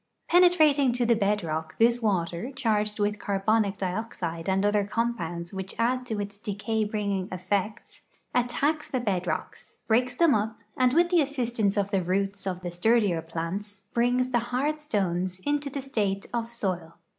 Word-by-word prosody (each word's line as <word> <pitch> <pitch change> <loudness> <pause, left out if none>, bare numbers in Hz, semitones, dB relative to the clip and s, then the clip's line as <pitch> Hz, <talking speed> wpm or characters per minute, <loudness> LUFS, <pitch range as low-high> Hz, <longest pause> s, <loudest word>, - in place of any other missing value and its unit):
Penetrating 310 -7 +5
to 245 0 +1
the 235 0 +4
bed 210 -1 +1
rock, 160 0 -3
this 235 +1 +4
water, 185 +1 -1
charged 215 -4 0
with 210 0 0
carbonic 200 0 +1
dioxide 180 -4 -3
and 190 +1 +2
other 205 0 +3
com 230 +4 0
pounds 170 -2 -5
which 190 0 -5
add 250 +2 0
to 220 -4 -2
its 205 0 -5
decay 210 +2 -2
bringing 200 -3 -2
effects, 190 +3 -3 0.3
attacks 280 +5 +1
the 255 - -1
bed 190 -6 -1
rocks, 160 - -4
breaks 245 +2 +2
them 330 0 +4
up, 220 +1 -1
and 255 +1 +3
with 345 +1 +4
the 350 -2 +5
assistance 240 -7 0
of 200 0 0
the 195 -2 +2
roots 195 +2 -1
of 185 -1 -3
the 175 -1 -4
sturdier 195 -1 +2
plants 185 +6 -5
brings 245 +2 +2
the 245 -2 +2
hard 290 +5 0
stones 185 - -1
into 290 +4 -1
the 275 0 -5
state 205 -7 -1
of 230 -1 -1
soil. 185 -8 -3
210 Hz, 170 wpm, -27 LUFS, 190-245 Hz, 0.3 s, Penetrating